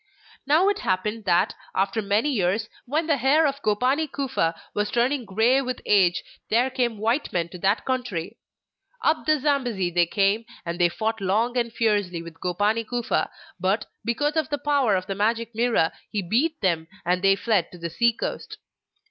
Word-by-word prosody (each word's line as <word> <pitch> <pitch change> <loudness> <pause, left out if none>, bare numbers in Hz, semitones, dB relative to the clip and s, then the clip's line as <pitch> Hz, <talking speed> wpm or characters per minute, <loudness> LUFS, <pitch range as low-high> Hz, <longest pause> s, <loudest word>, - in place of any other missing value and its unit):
Now 315 +7 +4
it 410 0 -1
happened 210 +4 -1
that, 180 +3 +2 0.2
after 195 +3 +1
many 210 +8 +1
years, 205 -1 0 0.2
when 310 +6 0
the 310 -3 +2
hair 275 +6 +4
of 280 -1 -1
Gopani 260 +8 +1
Kufa 255 -12 -1
was 210 0 -1
turning 245 +2 +1
grey 225 +7 +3
with 255 -2 -4
age, 185 -3 +3 0.3
there 245 +4 +2
came 245 -4 0
white 230 +7 0
men 170 -2 -1
to 180 - -10
that 195 +4 +1
country. 240 -7 -3 0.7
Up 315 0 +1
the 310 -1 +3
Zambesi 245 -10 0
they 175 0 +3
came, 200 +4 +1 0.2
and 170 +1 -4
they 175 -1 +4
fought 220 +4 -2
long 220 +6 +1
and 235 -2 0
fiercely 205 -7 0
with 170 -1 -11
Gopani 205 +6 +1
Kufa; 240 +1 -1 0.3
but, 190 +4 0 0.2
because 290 +6 0
of 315 -4 0
the 290 - -1
power 280 -8 +2
of 185 0 -1
the 195 - -3
Magic 230 +3 -1
Mirror, 230 -7 +2 0.2
he 205 -3 -2
beat 275 - 0
them, 170 -5 0 0.2
and 180 +1 +1
they 195 0 +5
fled 200 -3 0
to 180 - -11
the 170 -1 -5
sea 235 +7 +3
coast. 230 - -5
220 Hz, 180 wpm, -24 LUFS, 190-255 Hz, 0.7 s, they